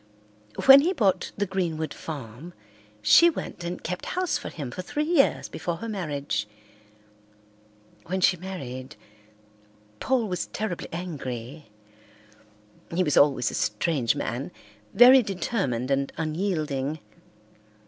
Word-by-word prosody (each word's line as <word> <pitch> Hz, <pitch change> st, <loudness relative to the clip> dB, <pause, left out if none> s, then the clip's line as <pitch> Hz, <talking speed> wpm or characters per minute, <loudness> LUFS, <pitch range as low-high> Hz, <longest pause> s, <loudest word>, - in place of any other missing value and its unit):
When 270 Hz, +1 st, +10 dB
he 350 Hz, +6 st, +1 dB
bought 205 Hz, -, +1 dB
the 205 Hz, -, 0 dB
Greenwood 170 Hz, -5 st, -2 dB
farm 145 Hz, +2 st, -8 dB, 0.5 s
she 340 Hz, -, +7 dB
went 180 Hz, -, -6 dB
and 175 Hz, +1 st, -5 dB
kept 180 Hz, +2 st, -4 dB
house 365 Hz, -2 st, -1 dB
for -, -, -4 dB
him 140 Hz, -7 st, -6 dB
for 185 Hz, -, -5 dB
three 295 Hz, +11 st, -2 dB
years 310 Hz, -3 st, +2 dB
before 165 Hz, +1 st, -4 dB
her 230 Hz, +7 st, -7 dB
marriage. 145 Hz, -, -3 dB, 1.6 s
When 190 Hz, +2 st, -1 dB
she 180 Hz, 0 st, +4 dB
married, 150 Hz, -7 st, -7 dB, 1.0 s
Paul 255 Hz, -4 st, +1 dB
was 180 Hz, -2 st, -3 dB
terribly 210 Hz, -5 st, -4 dB
angry. 145 Hz, -6 st, -6 dB, 1.2 s
He 180 Hz, +2 st, +1 dB
was 150 Hz, -4 st, 0 dB
always 135 Hz, -5 st, +4 dB
a -, -, -9 dB
strange 120 Hz, +3 st, 0 dB
man, 120 Hz, +4 st, -3 dB, 0.4 s
very 255 Hz, +2 st, +8 dB
determined 180 Hz, -, -2 dB
and 135 Hz, 0 st, 0 dB
unyielding. 155 Hz, -4 st, -2 dB
170 Hz, 120 wpm, -26 LUFS, 140-195 Hz, 1.6 s, When